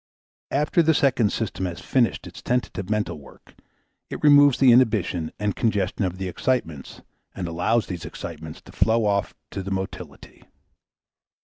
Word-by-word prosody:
After 150 +4 +2
the 160 -1 +3
second 125 -7 +2
system 95 -4 -3
has 85 0 -6
finished 120 +5 0
its - - -11
tentative 120 -6 -2
mental 105 -7 -1
work, 70 - -17 0.6
it - - -7
removes 145 -2 +6
the 130 -2 +6
inhibition 105 -9 +2
and 105 -1 -2
congestion 105 -3 0
of 90 0 -3
the 95 0 -4
excitements 85 - -3 0.3
and 90 -2 -4
allows 105 +8 0
these 90 -3 -6
excitements 80 -2 -8
to - - -15
flow 115 0 +2
off 100 0 0 0.2
to 100 - -4
the 95 - -6
motility. 95 0 -6
105 Hz, 150 wpm, -24 LUFS, 90-125 Hz, 0.6 s, removes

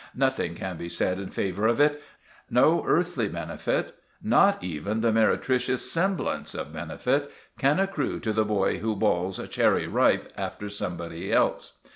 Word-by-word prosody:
"Nothing 130 -10 0
can 90 0 -5
be 85 - -6
said 90 +2 -1
in 100 - -6
favour 100 +3 -1
of 120 +3 +1
it. 145 0 +3 0.5
No - - +4
earthly - - +1
benefit—not - - 0
even 90 +6 -3
the 115 0 +3
meretricious 125 +3 +1
semblance 185 0 -1
of - - -5
benefit—can 140 +5 -1
accrue 195 -6 -1
to 110 - -1
the 110 0 +2
boy 105 -2 0
who 110 0 -1
bawls 95 -3 0
'Cherry - - +2
Ripe!' - - +2
after 105 - -5
somebody 85 -4 -5
else. - - +1
110 Hz, 140 wpm, -26 LUFS, 95-130 Hz, 0.5 s, No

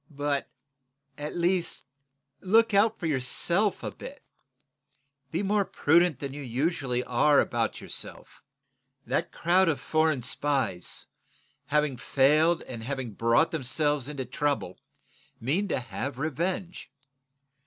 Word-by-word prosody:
But, 145 -1 -2 0.7
at 150 +4 -5
least, 175 -2 0 0.5
look 225 +3 +3
out 215 +3 +4
for 175 - -4
yourself 170 - +1
a - - -3
bit. - - -10 1.1
Be 165 +7 -2
more 205 +1 +2
prudent 170 -3 +3
than 140 -1 -5
you 145 - -7
usually 130 -1 -1
are 140 +5 +4
about 115 -2 0
yourself. - - -7 0.6
That - - -1
crowd 175 +1 +3
of 145 -5 0
foreign 155 -3 +1
spies, 130 - -1 0.6
having 150 -2 +1
failed 150 +6 +3
and 115 -2 -8
having 130 -2 -4
brought 115 +9 +3
themselves 145 -1 0
into 140 -3 -4
trouble, 135 -7 -2 0.6
mean 160 - 0
to - - 0
have 130 +2 -5
revenge. 170 +4 -3
145 Hz, 120 wpm, -28 LUFS, 130-170 Hz, 1.1 s, out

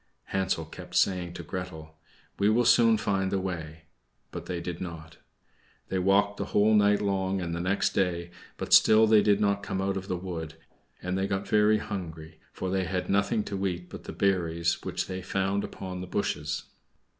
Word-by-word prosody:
Hansel 95 -4 0
kept 80 - -10
saying 90 -2 +2
to - - -7
Gretel, 80 -4 -7 0.4
"We 100 +1 +4
will 120 +3 +3
soon 115 -1 +6
find 95 -2 0
the 100 - +1
way." 80 -4 -5 0.5
But - - -7
they 90 -2 -3
did 85 0 -5
not. 80 -3 -8 0.7
They 95 - 0
walked 100 +2 +3
the - - -2
whole 105 +2 +3
night 105 -1 +4
long 95 -1 0
and 85 -2 -3
the 85 - -2
next 95 +3 +1
day, 85 -2 0 0.3
but - - -2
still 110 0 +7
they 110 -1 +6
did 105 -1 +3
not 100 -1 +1
come 95 -1 -3
out 95 0 0
of 95 0 -6
the 90 - -1
wood; 85 -3 -6 0.5
and 90 +1 -2
they 95 - 0
got 95 0 -2
very 105 0 +4
hungry, 85 -6 -6
for 95 - -4
they 95 -1 0
had 90 0 -2
nothing 100 +3 +2
to 100 -1 -2
eat 90 -1 -5
but - - -9
the - - -6
berries 85 -3 0
which - - -2
they 95 0 -5
found 95 +2 -1
upon 90 -1 -6
the 90 - -6
bushes. 75 -6 -2
95 Hz, 190 wpm, -28 LUFS, 85-100 Hz, 0.7 s, still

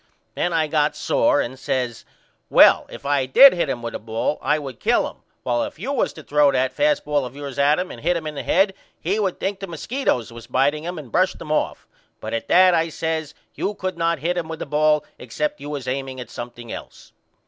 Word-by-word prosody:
Then 175 - -1
I 165 -2 +2
got 150 -1 +1
sore 145 - +2
and 120 - -3
I - - -14
says 125 -3 -3 0.4
Well - - +6
if - - -11
I 140 -2 +1
did 270 - +9
hit 170 -5 -1
him 120 -3 -3
with 115 - -4
a - - -4
ball 115 +6 -2
I 150 +3 +2
would 135 -5 -7
kill - - +2
him - - -11 0.3
while 120 -1 0
if - - -4
you 235 - -4
was 260 - +1
to 155 - -11
throw 145 -1 +3
that 130 -1 0
fast 295 0 +1
ball 150 -1 +1
of 125 +1 -7
yours 140 -2 -6
at 145 +2 +4
him 180 +1 -3
and - - -10
hit 175 +1 +1
him 160 - -6
in 155 - -4
the 140 - -5
head 195 +2 +2 0.3
he 195 +6 -1
would 195 -4 -1
think 195 0 -2
the 195 - -6
musketoes 170 - -2
was 115 0 -11
biteing 140 +4 +1
him 175 0 -4
and 140 -7 -9
brush 185 +1 +2
them 155 - -8
off. 155 - -1 0.3
But - - -6
at 115 - -3
that, 185 0 +6
I 165 0 +2
says, 160 -1 -3 0.2
you 205 - -3
could 185 -1 -3
not 165 0 0
hit 170 +5 -1
him 165 - -5
with 160 0 -5
a - - -7
ball 150 +1 +2
except 300 0 -3
you 145 - -6
was 140 -4 -5
aiming 130 0 -3
at 125 - -8
something 120 -1 -8
else. - - -10
150 Hz, 245 wpm, -22 LUFS, 130-175 Hz, 0.4 s, did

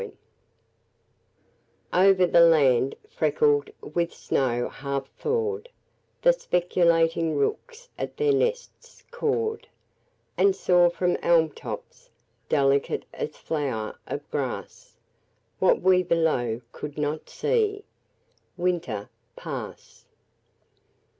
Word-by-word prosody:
Thaw 185 +2 +4
OVER 190 -2 +5
the 170 - +4
land 140 -6 +4
freckled 440 -1 +1
with 170 -1 -2
snow 120 -2 -1
half 140 -1 -4
thawed 445 0 -2 0.5
The - - +7
speculating 170 - +1
rooks 470 - -2
at - - -5
their 445 -1 +2
nests 485 +2 -3
cawed 450 -2 -2 0.7
And 395 -1 +4
saw 175 -1 +4
from 175 +1 0
elm 165 -2 +3
tops, - - -9 0.4
delicate 140 -1 +1
as - - -5
flower 135 -9 -3
of - - -5
grass, - - -5 0.6
What 185 - +3
we 185 0 +4
below 155 -10 0
could 150 -1 -8
not 150 +1 -3
see, 425 -3 0 0.7
Winter 170 - -2 0.3
pass. - - -8
175 Hz, 95 wpm, -25 LUFS, -, 0.7 s, The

